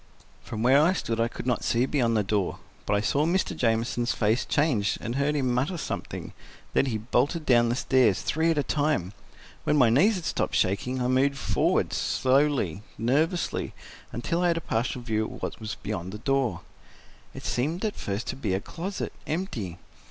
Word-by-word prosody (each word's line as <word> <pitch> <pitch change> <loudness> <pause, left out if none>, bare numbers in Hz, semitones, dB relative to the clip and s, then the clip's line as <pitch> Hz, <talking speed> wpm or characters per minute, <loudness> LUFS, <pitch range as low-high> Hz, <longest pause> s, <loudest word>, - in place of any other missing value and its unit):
From 110 0 -5
where 135 +4 +6
I 170 +4 +4
stood 115 -10 -2
I 115 - +3
could 120 - -8
not 125 -2 0
see 120 +2 +2
beyond 120 -5 +1
the 105 - +2
door, 100 -1 -1 0.3
but - - +2
I 100 - +2
saw 140 +6 +1
Mr. 175 +2 +1
Jamieson's 120 -1 +1
face 110 +3 +1
change 130 -10 +1
and 120 0 -4
heard 140 +3 +1
him 130 -4 +1
mutter 140 +9 0
something, - - -5 0.4
then 135 - +3
he 115 -4 -1
bolted 130 - 0
down 120 -3 +4
the 120 - +1
stairs, 125 -6 +3
three 160 +2 +1
at 165 - +1
a 145 - +2
time. 145 - 0 0.5
When 150 - +2
my 125 -5 +5
knees 195 - +4
had 180 -3 -5
stopped - - -1
shaking, 100 +7 +1
I - - +1
moved 135 +2 +2
forward, 100 -8 +1
slowly, 130 - +1 0.2
nervously, 155 - 0 0.4
until 165 +9 -1
I 180 - +3
had 170 -1 +2
a - - -2
partial 120 0 -2
view 110 -2 0
of - - -8
what - - -4
was 110 -1 -5
beyond 95 -4 -5
the - - -5
door. 135 +1 0 0.7
It - - -8
seemed 155 - -1
at 210 - -1
first 100 +3 -3
to - - -2
be 105 -8 -1
a - - 0
closet, 180 - -5
empty. 120 - -3
125 Hz, 195 wpm, -27 LUFS, 110-150 Hz, 0.7 s, where